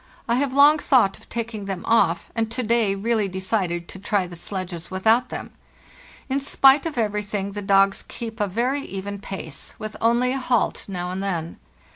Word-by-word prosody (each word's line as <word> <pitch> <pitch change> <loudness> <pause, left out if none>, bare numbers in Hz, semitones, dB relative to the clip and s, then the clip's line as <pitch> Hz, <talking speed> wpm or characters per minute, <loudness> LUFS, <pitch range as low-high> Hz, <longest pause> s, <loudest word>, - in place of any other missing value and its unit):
I 235 - +2
have 280 0 0
long 290 +3 +6
thought 245 -10 +3
of - - -20
taking 225 -3 -4
them 195 -3 -4
off, 230 0 +2
and 225 -1 -1
to 250 +2 -3
day 225 -3 +2
really 215 +1 0
decided 185 -2 -2
to 190 - -8
try 200 -1 0
the 175 -1 -9
sledges 175 -1 -6
without 220 +6 +2
them. - - -6 0.8
In 270 +1 0
spite 275 +2 +4
of 310 - -6
everything 210 -2 -1
the 205 +1 -5
dogs 195 0 +3
keep 230 -1 -7
a 205 - +1
very 245 +8 0
even 200 -2 -6
pace, 190 -6 -6
with 215 0 -6
only 235 +2 +3
a 270 - -2
halt 250 -3 0
now 180 -2 -4
and 185 +1 -3
then. 170 -4 -3
210 Hz, 185 wpm, -23 LUFS, 190-235 Hz, 0.8 s, long